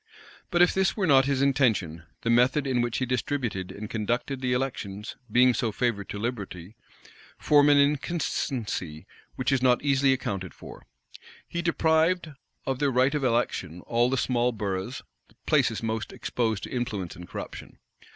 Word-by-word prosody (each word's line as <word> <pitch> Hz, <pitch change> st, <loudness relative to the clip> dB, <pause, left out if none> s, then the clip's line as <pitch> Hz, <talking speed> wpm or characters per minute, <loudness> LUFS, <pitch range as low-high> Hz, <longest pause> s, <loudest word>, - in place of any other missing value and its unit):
But 175 Hz, -1 st, +4 dB
if 180 Hz, -, +3 dB
this 190 Hz, +2 st, +1 dB
were 195 Hz, -, +1 dB
not 135 Hz, -5 st, +5 dB
his 140 Hz, -1 st, +1 dB
intention, 110 Hz, -, +1 dB, 0.2 s
the 115 Hz, -, +1 dB
method 125 Hz, +5 st, +3 dB
in 130 Hz, -3 st, +1 dB
which 120 Hz, -1 st, -1 dB
he 130 Hz, -, 0 dB
distributed 125 Hz, -6 st, -2 dB
and 105 Hz, +1 st, -7 dB
conducted 120 Hz, +5 st, -2 dB
the 125 Hz, -1 st, 0 dB
elections, 115 Hz, -5 st, -3 dB, 0.2 s
being 125 Hz, +2 st, +5 dB
so 115 Hz, 0 st, -1 dB
favorable 105 Hz, -3 st, -1 dB
to -, -, -4 dB
liberty, 100 Hz, -4 st, -5 dB, 0.6 s
form 145 Hz, -1 st, +4 dB
an 145 Hz, -, +6 dB
inconsistency 135 Hz, -, -1 dB, 0.3 s
which 130 Hz, +1 st, -1 dB
is 135 Hz, -2 st, +2 dB
not 125 Hz, 0 st, +3 dB
easily 140 Hz, -1 st, +3 dB
accounted 100 Hz, -8 st, -3 dB
for. -, -, -12 dB, 0.6 s
He 170 Hz, -, -3 dB
deprived 165 Hz, 0 st, +2 dB, 0.3 s
of 135 Hz, -1 st, -2 dB
their 145 Hz, -, +2 dB
right 130 Hz, +2 st, +2 dB
of 150 Hz, -2 st, -1 dB
election 115 Hz, -8 st, -1 dB
all 120 Hz, +1 st, +1 dB
the 135 Hz, -, 0 dB
small 125 Hz, -1 st, +1 dB
boroughs, 105 Hz, +2 st, -4 dB, 0.4 s
places -, -, +2 dB
the -, -, -4 dB
most 110 Hz, -1 st, -3 dB
exposed 110 Hz, -4 st, -2 dB
to -, -, -6 dB
influence 110 Hz, -8 st, -3 dB
and 90 Hz, 0 st, -10 dB
corruption. -, -, -8 dB
125 Hz, 165 wpm, -27 LUFS, 105-140 Hz, 0.6 s, an